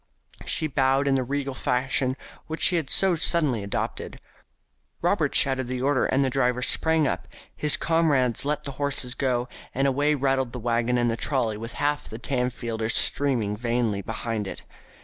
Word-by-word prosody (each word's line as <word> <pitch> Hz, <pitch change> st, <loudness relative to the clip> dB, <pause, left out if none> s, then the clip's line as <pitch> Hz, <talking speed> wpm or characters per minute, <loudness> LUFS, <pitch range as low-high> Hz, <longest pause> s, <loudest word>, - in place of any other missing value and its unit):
She 155 Hz, -, 0 dB
bowed 135 Hz, -1 st, +1 dB
in 140 Hz, -, +3 dB
the 130 Hz, -1 st, +1 dB
regal 140 Hz, +1 st, -3 dB
fashion 130 Hz, +1 st, -1 dB, 0.3 s
which 160 Hz, +1 st, -2 dB
she 180 Hz, -, +5 dB
had 155 Hz, -5 st, -3 dB
so 190 Hz, -2 st, +5 dB
suddenly 150 Hz, -8 st, +2 dB
adopted. 100 Hz, 0 st, -4 dB, 0.8 s
Robert -, -, +1 dB
shouted 130 Hz, -2 st, +3 dB
the 130 Hz, 0 st, -3 dB
order, 140 Hz, -1 st, +2 dB
the 135 Hz, 0 st, +2 dB
driver 125 Hz, -2 st, +1 dB
sprang 160 Hz, 0 st, +3 dB
up, -, -, -3 dB, 0.3 s
his 150 Hz, -1 st, +3 dB
comrades 145 Hz, -7 st, +1 dB
let 145 Hz, +1 st, -2 dB
the 140 Hz, -, -5 dB
horses 135 Hz, -3 st, -2 dB
go, 125 Hz, -3 st, -1 dB, 0.3 s
and 135 Hz, +2 st, +2 dB
away 145 Hz, +3 st, +2 dB
rattled 135 Hz, -3 st, 0 dB
the 125 Hz, -, -5 dB
waggon 120 Hz, +1 st, 0 dB
and 120 Hz, -1 st, +1 dB
the 115 Hz, -, -3 dB
trolly 120 Hz, -5 st, 0 dB
with 115 Hz, +3 st, -7 dB
half 145 Hz, 0 st, -1 dB
the 110 Hz, -, -7 dB
Tamfielders 120 Hz, -3 st, -2 dB
streaming 120 Hz, -8 st, 0 dB
vainly 115 Hz, -2 st, -1 dB
behind 110 Hz, 0 st, -4 dB
it. -, -, -7 dB
130 Hz, 170 wpm, -25 LUFS, 120-140 Hz, 0.8 s, she